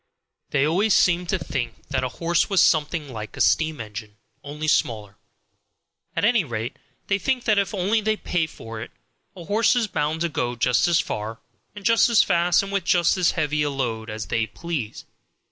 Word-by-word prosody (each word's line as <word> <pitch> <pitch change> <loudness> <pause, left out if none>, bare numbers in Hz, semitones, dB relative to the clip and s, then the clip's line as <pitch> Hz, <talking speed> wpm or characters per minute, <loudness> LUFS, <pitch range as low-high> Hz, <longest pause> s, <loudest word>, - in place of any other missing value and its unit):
They 140 - +2
always 190 +7 +2
seemed 175 -1 +3
to 190 - +2
think 125 - -4
that 130 -2 -1
a 130 - -1
horse 170 +6 0
was 195 -2 +2
something 150 -1 +2
like 105 -2 -7
a - - -7
steam 160 -2 +2
engine, 105 -1 -8 0.3
only 150 +2 -5
smaller. 105 -8 0 1.0
At - - +1
any 235 -3 +3
rate, 115 -4 -5 0.3
they 195 0 0
think 255 +4 -1
that 215 -3 +3
if 200 - -1
only 205 +3 +1
they 215 +1 0
pay 175 -5 -1
for 115 -6 -9
it 115 - -7 0.5
a 175 -3 -10
horse 210 +5 +3
is 240 -2 +2
bound 155 -4 -2
to 170 - +2
go 125 -5 -2
just 125 +4 +2
as 170 -1 +3
far 110 -9 -4 0.4
and 205 -1 -10
just 230 +1 +5
as 235 - +5
fast 175 +2 +2
and 200 - -6
with 200 -2 0
just 175 0 +3
as 180 -3 +2
heavy 150 -2 0
a 145 - +1
load 120 -5 -3
as 110 0 -5
they 110 -1 -1
please. 150 -10 -5
160 Hz, 195 wpm, -23 LUFS, 120-190 Hz, 1.0 s, just